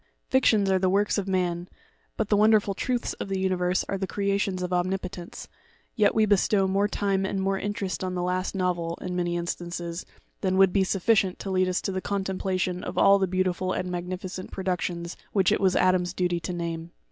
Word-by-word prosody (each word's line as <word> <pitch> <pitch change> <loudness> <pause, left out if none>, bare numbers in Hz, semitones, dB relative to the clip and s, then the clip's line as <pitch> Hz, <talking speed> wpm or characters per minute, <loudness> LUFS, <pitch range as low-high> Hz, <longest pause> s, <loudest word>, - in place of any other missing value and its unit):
Fictions 220 -6 +4
are 190 - +3
the 185 0 +2
works 205 +2 +2
of 195 - -4
man, 180 -2 -1 0.5
but 220 - -1
the 210 - +4
wonderful 210 -1 +4
truths 245 +4 -2
of - - -6
the 195 - -1
universe 185 -1 +1
are 195 - -2
the 190 - -2
creations 200 -2 -1
of 180 0 -2
Omnipotence; 180 0 -3 0.5
yet 210 -3 +3
we 220 -1 +4
bestow 200 -1 +3
more 195 +2 +2
time 195 -2 0
and 195 0 -1
more 195 0 0
interest 200 -2 -3
on 185 0 -2
the 180 - -1
last 185 +2 -1
novel, 175 -3 -1
in 180 -1 -4
many 175 -1 0
instances, 170 0 -4 0.4
than 185 -1 0
would 190 -1 +5
be 195 - +3
sufficient 195 0 +2
to 195 - -5
lead 185 0 +2
us 180 - 0
to - - -1
the 185 0 -2
contemplation 190 -2 -2
of - - -6
all 200 0 +6
the 190 - +1
beau 185 +1 +1
tiful 185 0 -1
and 180 0 -3
magnificent 180 +1 -5
productions 180 -2 -3 0.2
which 190 -3 +3
it - - +1
was 190 -1 +3
Adam's 185 -1 +2
duty 175 -1 0
to 170 - -4
name. 170 -1 -4
185 Hz, 205 wpm, -26 LUFS, 180-195 Hz, 0.5 s, all